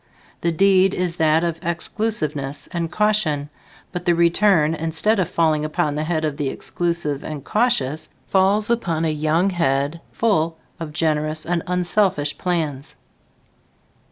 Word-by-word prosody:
The 170 - +1
deed 195 +2 +4
is 180 -1 -2
that 160 +1 +3
of 165 -1 -3
exclusiveness 165 -5 -1
and 170 -1 -3
caution, 175 -10 +1 0.4
but 180 -1 -5
the 175 -1 +3
return, 170 -2 +3
instead 165 +7 0
of 180 -2 0
falling 160 -3 +1
upon 155 -1 -1
the 150 +1 -2
head 160 -1 -1
of 150 -2 -3
the 145 -3 -1
exclusive 170 -3 -2
and 150 -3 -6
cautious, 155 - 0 0.2
falls 200 +3 +2
upon 170 -9 0
a 160 - +1
young 155 +5 +1
head 145 -1 0
full 165 -8 +1 0.2
of 165 -2 -5
generous 155 -1 -1
and 170 0 0
unselfish 180 -4 +1
plans. 155 -6 -2
165 Hz, 140 wpm, -21 LUFS, 155-180 Hz, 0.4 s, deed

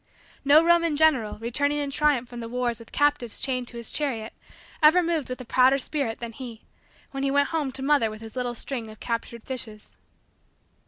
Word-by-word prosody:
No 290 +3 +6
Roman 335 -2 +3
general, 285 -9 +3
returning 285 +6 0
in 285 -1 -2
triumph 280 -4 +2
from 240 0 -9
the 230 -1 -6
wars 240 -1 -1
with 230 - -14
captives 290 -6 +1
chained 255 -2 -2
to 240 - -8
his 235 - -5
chariot, 235 -7 -2 0.5
ever 320 +4 +6
moved 330 -5 -1
with 255 - -5
a - - -9
prouder 260 +3 +4
spirit 270 -4 -2
than 235 -1 -5
he, 230 -2 -9 0.5
when 270 - -4
he 275 - +1
went 285 +1 +2
home 305 -5 -1
to 265 - -5
mother 275 -5 +3
with 215 0 -9
his 225 +1 -9
little 245 -1 -2
string 235 -2 -4
of 215 - -13
captured 230 -1 -4
fishes. 225 -5 -7
255 Hz, 200 wpm, -25 LUFS, 235-290 Hz, 0.5 s, No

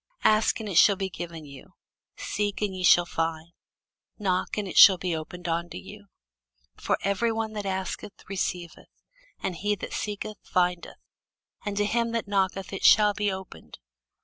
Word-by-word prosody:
Ask, 215 +1 +3
and 220 - -6
it 180 -4 +3
shall 200 - +6
be 190 -1 -4
given 165 -2 -7
you; 140 -2 -14 0.4
seek, 205 -1 -2
and 195 -2 -2
ye 185 - -5
shall 175 -1 +6
find; 165 0 -3 0.7
knock, 185 -2 -1
and 210 -2 -2
it - - -7
shall 190 -2 +9
be 175 -1 -2
opened 170 +3 -7
unto 170 +1 -2
you: 205 +1 -12 0.7
for - - -1
every 200 +4 +1
one 220 -1 -3
that 205 -2 -4
asketh 190 +2 -5
receiveth; 180 -3 -4 0.5
and 180 - -2
he 205 +3 0
that 190 - -8
seeketh 210 0 -4
findeth; 180 -1 -1 0.7
and 205 -1 -4
to 205 - +2
him 230 +2 0
that 230 -2 -2
knocketh 195 -1 -1
it 195 - -5
shall 210 -1 +6
be 205 -1 -1
opened. 190 - -9
195 Hz, 170 wpm, -26 LUFS, 175-210 Hz, 0.7 s, shall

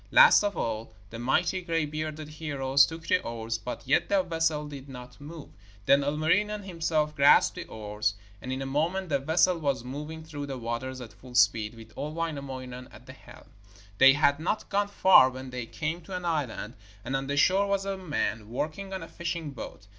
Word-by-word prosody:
Last 485 - +8
of 205 -1 -1
all 110 -1 -3 0.2
the 115 - -7
mighty 135 +9 +1
gray 165 -3 0
bearded 155 0 -5
heroes 140 -3 +2
took 165 0 -9
the - - +2
oars, 115 -1 -4
but 125 +3 -7
yet 135 - +2
the 195 -2 +3
vessel 165 -3 -1
did 140 -1 -9
not 125 0 -11
move. 150 +1 -9 0.4
Then 140 +4 +5
Ilmarinen 180 +9 +1
himself 160 -4 -1
grasped 140 0 +6
the - - -5
oars, 105 -1 -3 0.3
and 130 - -5
in 130 +1 -2
a - - -5
moment 165 +7 -1
the 140 -2 +1
vessel 165 +5 +2
was 140 -6 -1
moving 150 +5 -7
through 145 -3 -6
the 135 -2 -5
waters 125 +2 -4
at 115 - -10
full 125 -1 -14
speed, 115 -4 +3
with 110 -1 -13
old 150 +2 -5
Wainamoinen 135 -6 -5
at - - -15
the - - -11
helm. - - -15 0.5
They 135 0 +9
had 145 0 +3
not 180 +7 -2
gone 205 0 +1
far 190 -9 +6
when 130 0 -8
they 125 -2 -5
came 160 +6 -3
to 190 - -6
an 180 -1 -5
island, 135 -8 -2 0.3
and 130 +2 -2
on 135 0 -2
the 140 +1 -2
shore 195 +6 +4
was 200 -1 0
a 195 0 -2
man 150 - -3
working 160 - -4
on 190 -3 -4
a - - -9
fishing 170 -3 -4
boat. 115 -5 -9
145 Hz, 200 wpm, -28 LUFS, 130-165 Hz, 0.5 s, They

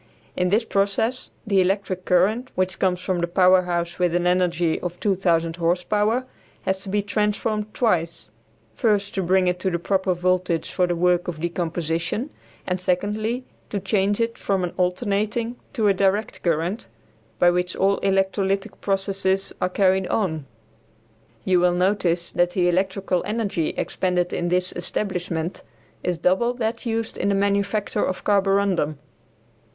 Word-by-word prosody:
In 180 0 +1
this 215 +5 +3
process 220 +4 0 0.2
the 200 -3 +3
electric 185 -1 -1
current, 210 +8 +2
which 185 0 -1
comes 180 -2 +1
from 185 -1 -1
the 170 - 0
power 185 +1 +5
house 175 -1 -3
with 175 -1 +2
an 175 0 +1
energy 175 -2 +2
of 175 0 -5
2000 170 -4 +1
horse 175 +1 +1
power, 215 +6 +1 0.4
has 190 0 0
to 195 - -9
be 205 +1 0
transformed 210 +1 -1
twice; 170 - 0 0.4
first, 205 - +1
to 195 - -1
bring 185 +1 +2
it 180 0 0
to 190 - 0
the 170 - -1
proper 190 +1 0
voltage 180 -1 0
for 180 -1 +1
the 175 - 0
work 175 +1 +2
of 170 -3 -4
decomposition, 170 - -2 0.3
and, 180 0 -2
secondly, 210 +7 -1 0.2
to 205 - -2
change 200 +1 +1
it 230 0 -1
from 195 -2 0
an 175 - -3
alternating 210 +5 0 0.2
to 225 -6 +1
a 200 - +5
direct 195 +3 0
current, 170 - -1 0.5
by 175 - +5
which 180 +1 -1
all 195 +1 +2
electrolytic 195 +1 0
processes 195 -1 0
are 180 - +1
carried 190 0 +2
on. 160 -9 -1 1.0
You 185 -1 +4
will 175 0 +3
notice 180 -2 +1
that 175 0 +2
the 175 0 +1
electrical 190 0 0
energy 210 -7 -1
expended 180 -1 -1
in 175 - -1
this 180 +1 +1
establishment 175 -2 -3 0.4
is 180 -1 -1
double 215 +9 +2
that 230 0 -3
used 225 0 -2
in 200 - 0
the 200 - +2
manufacture 200 +1 0
of 185 - -2
carborundum. 195 -6 +2
190 Hz, 155 wpm, -23 LUFS, 175-205 Hz, 1.0 s, power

